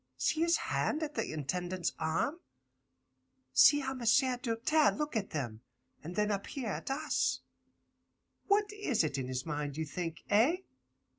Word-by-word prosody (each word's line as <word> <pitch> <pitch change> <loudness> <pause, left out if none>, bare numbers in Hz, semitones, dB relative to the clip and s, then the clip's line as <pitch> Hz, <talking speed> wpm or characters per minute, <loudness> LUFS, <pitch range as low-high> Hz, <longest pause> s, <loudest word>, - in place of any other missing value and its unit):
See 220 - +1
his 335 0 +4
hand 315 +1 -1
at 300 -1 -4
the - - -2
Intendant's 175 +4 -2
arm. 165 - 0 1.1
See 290 0 +7
how 265 0 -2
M'sieu' 255 +1 +3
Doltaire 265 +6 +3
look 300 -2 -3
at 210 -3 -1
them, 120 -7 -4 0.4
and 170 +4 -7
then 210 +1 +1
up 200 -1 -2
here 260 -6 -4
at 200 - -4
us. 300 +3 0 1.1
What 415 0 +2
is 350 - 0
it 145 -3 -1
in 130 - -3
his 130 0 -3
mind, 150 -2 -3
you 160 - -1
think? 165 +2 -5
Eh? 230 +11 +5
215 Hz, 155 wpm, -32 LUFS, -, 1.1 s, See